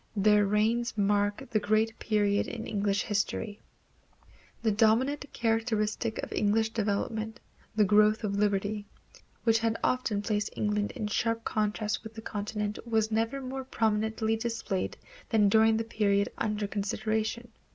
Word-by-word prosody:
Their 210 0 +4
reigns 220 +3 +1
mark 205 +4 +1
the 215 - +3
great 215 +2 +1
period 205 -2 +1
in 230 -2 -5
English 205 -1 0
history. 210 0 -2 1.0
The 220 - +3
dominant 230 +7 +2
characteristic 225 -1 0
of - - -5
English 220 +1 +2
development, 220 +1 -2 0.4
the 215 -1 +4
growth 215 +2 +4
of 200 -2 -1
liberty, 205 0 0 0.6
which 225 -1 +4
had 225 0 0
often 225 -5 0
placed 210 -1 0
England 210 -1 0
in 215 - -4
sharp 230 +2 0
contrast 210 0 -1
with 220 0 -10
the 220 - -7
continent 210 0 -3
was 220 -1 +1
never 225 +5 0
more 265 +1 -5
prominently 220 -2 0
displayed 225 -4 -3 0.3
than 210 -4 +4
during 220 +1 +5
the 225 - 0
period 205 -3 +1
under 210 -2 -1
consideration. 220 +3 -2
215 Hz, 140 wpm, -29 LUFS, 205-225 Hz, 1.0 s, during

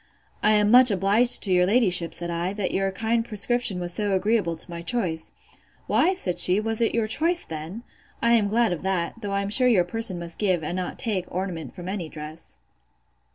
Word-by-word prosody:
I 215 - +3
am 210 0 +3
much 250 +1 +8
obliged 205 +5 +4
to 195 - -1
your 180 0 +3
ladyship, 185 -6 +2
said 170 0 -5
I, 170 +3 -3
that 205 -2 -3
your 195 0 0
kind 225 +3 -1
prescription 215 -2 0
was 175 -1 -5
so 205 0 -1
agreeable 195 -3 0
to - - 0
my 170 0 -6
choice. 170 -4 -3 0.5
Why, 370 +4 +2
said 180 - -3
she, 180 +2 +5
was 225 +1 -1
it 225 - +1
your 230 -1 +1
choice 330 +10 0
then?—I 185 +8 -5
am 220 -3 +3
glad 225 +1 +1
of 175 - -4
that: 190 +3 -3
though 205 -2 -5
I 200 0 0
am 200 - -4
sure 250 +4 +3
your 210 -8 +4
person 215 0 -1
must 170 -1 -5
give, 185 -6 0
and 170 - -4
not 185 -1 -4
take, 200 -6 -2
ornament 175 -5 -5
from 180 -1 -9
any 185 -4 -4
dress. 155 - -9
195 Hz, 205 wpm, -24 LUFS, 175-225 Hz, 0.5 s, much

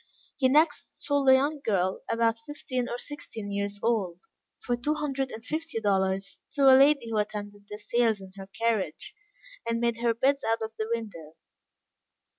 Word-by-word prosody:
He 260 -2 +3
next 305 +5 +1
sold 285 -2 +2
a - - +9
young 285 +3 +2
girl, 190 -3 0
about 230 0 +1
fifteen 255 -4 -3
or 240 - -3
sixteen 225 -7 -7
years 200 0 -3
old, 195 -7 0 0.4
for 245 - -1
two 290 +6 -1
hundred 275 -3 -2
and 225 0 -9
fifty 315 -5 -3
dollars, 195 -2 0
to 280 - +1
a - - +9
lady 275 -3 +4
who 215 - +1
attended 205 -1 -5
the 210 - -6
sales 220 0 +1
in 190 -1 -11
her 195 -1 -9
carriage, 220 - -2 0.5
and 230 0 -1
made 235 -1 0
her 235 -1 +2
bids 275 +4 +2
out 225 0 0
of 220 - -4
the 220 0 -2
window. 195 -9 -5
230 Hz, 175 wpm, -28 LUFS, 205-265 Hz, 0.5 s, a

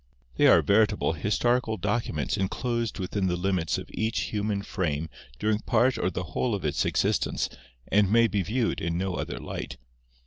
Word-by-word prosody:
They - - +5
are - - +6
veritable 105 -4 +3
historical 110 +7 +1
documents 85 - -1
enclosed 115 +4 -2
within 95 0 -1
the 90 - 0
limits 90 -2 0
of - - -7
each 110 +1 -1
human 105 -1 -1
frame 80 -6 -2 0.3
during 105 0 +1
part, 130 +3 +2
or 90 - +1
the 90 0 -4
whole 120 -4 0
of 95 - -5
its 75 - 0
existence - - 0 0.4
and 100 -1 +3
may 115 +1 +6
be 100 -2 0
viewed 115 +5 -1
in 85 0 -1
no 95 0 -1
other - - -4
light. - - -6
100 Hz, 170 wpm, -27 LUFS, 90-110 Hz, 0.4 s, are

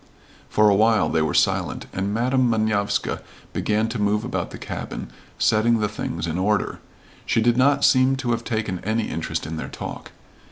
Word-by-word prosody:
For 105 0 +4
a 105 - +6
while 110 +2 +3
they 80 - +1
were 80 -2 0
silent, - - +1
and 95 +2 -2
Madam 125 +3 +2
Manovska 110 -2 0 0.3
began 110 +1 0
to 115 -2 -3
move 105 +1 +1
about 125 - -3
the - - -9
cabin, - - -6 0.3
setting 115 +2 +3
the 105 -1 0
things 90 - -4
in 85 +1 -2
order. 105 +2 0 0.4
She - - +1
did 115 +1 +3
not 140 +2 +4
seem 130 0 +4
to 130 -3 -2
have 115 0 -1
taken 110 -6 -2
any 110 +2 -1
interest - - -3
in 80 +1 -5
their - - -5
talk. - - -7
110 Hz, 185 wpm, -23 LUFS, 100-120 Hz, 0.4 s, a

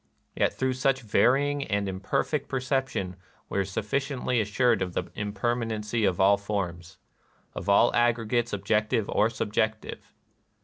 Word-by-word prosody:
Yet - - +2
through 130 -1 -1
such 135 +1 +1
varying 140 +7 +2
and 100 -1 -1
imperfect 95 +10 -2
perception 130 -8 -2 0.3
we - - -1
are - - +2
suf 95 +2 -4
ficiently 130 -1 0
assured 110 +1 +2
of 90 -1 -2
the 85 - -3
impermanency 110 +1 -1
of 90 -3 0
all 100 +1 +5
forms, 95 -4 -4 0.3
— - - -38
of - - -5
all 100 +4 +5
aggregates 120 0 +1
objective 105 +1 0
or 105 +2 +2
sub 105 -2 -4
jective. 110 0 -1
110 Hz, 145 wpm, -27 LUFS, 100-125 Hz, 0.3 s, all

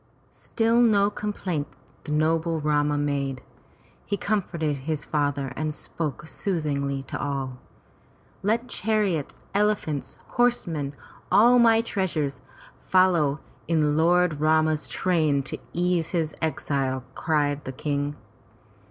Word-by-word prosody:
'' - - -36
Still 230 +1 +1
no 205 -3 +4
complaint 190 -8 -3 0.4
the - - -5
noble 160 +2 +1
Rama 150 -1 +1
made. 140 -2 -1 0.6
He 200 - -2
comforted 175 -7 -1
his 150 +2 -3
father 145 -3 -1
and 155 +1 -1
spoke 150 -2 -5
soothingly 140 -7 -2
to - - -5
all. 135 -3 -3 0.8
"Let 230 +5 0
chariots, 210 - -1
elephants, 200 -8 0
horsemen, 165 - 0 0.4
all 245 +3 +6
my 230 -1 +6
treasures 170 - -2 0.4
follow 170 -6 +3 0.3
in 155 -3 +2
Lord 170 -1 +3
Rama's 155 0 +2
train 155 -6 +1
to 135 - -5
ease 175 -1 +1
his 160 -4 -1
exile!" 135 -4 -1
cried 145 -1 0
the 130 - -5
King. 145 +1 -2
155 Hz, 115 wpm, -25 LUFS, 145-185 Hz, 0.8 s, all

